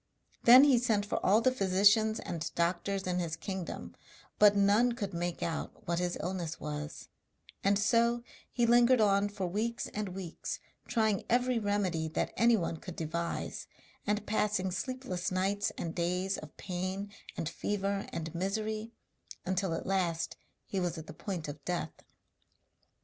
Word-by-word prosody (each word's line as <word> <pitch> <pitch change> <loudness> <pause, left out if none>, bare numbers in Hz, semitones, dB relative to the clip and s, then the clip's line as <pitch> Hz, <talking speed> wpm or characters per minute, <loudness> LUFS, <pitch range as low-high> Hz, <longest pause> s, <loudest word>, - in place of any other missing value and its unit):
Then 250 +3 +10
he 275 -4 +6
sent 220 -4 +1
for 210 - -2
all 210 +4 +5
the 255 - +4
physicians 205 0 +4
and 165 -2 -4
doctors 180 +3 0
in 180 -1 0
his 170 -2 -2
kingdom, 190 +1 -5 0.4
but 210 -1 +7
none 205 +5 +4
could 200 -5 -4
make 175 0 -2
out 165 -1 -4
what 170 0 +1
his 180 0 -1
illness 175 -2 -3
was; 150 +1 -6 0.5
and 200 0 +4
so 235 +3 +2 0.3
he 240 - +2
lingered 240 +1 +5
on 200 -1 +3
for 200 -2 -3
weeks 220 +6 -1
and 210 -2 -3
weeks 185 -4 -5 0.3
trying 220 -4 +1
every 245 0 +2
remedy 200 -6 0
that 155 - -2
anyone 225 -8 +3
could 180 +1 -8
devise, 170 +1 -3 0.4
and 210 0 0
passing 205 -3 0
sleepless 230 -3 -3
nights 195 +2 0
and 165 -1 -3
days 180 +2 -1
of 155 - -12
pain 185 +2 -4 0.3
and 160 - -2
fever 200 +2 -2
and 165 -1 -4
misery, 215 +5 -2 0.5
until 185 0 0
at 165 - -3
last 180 -4 0 0.3
he 195 - -2
was 175 -1 -1
at 160 - -7
the - - -9
point 180 -7 -4
of 145 0 -7
death. 175 -2 -2
195 Hz, 155 wpm, -32 LUFS, 175-215 Hz, 0.5 s, Then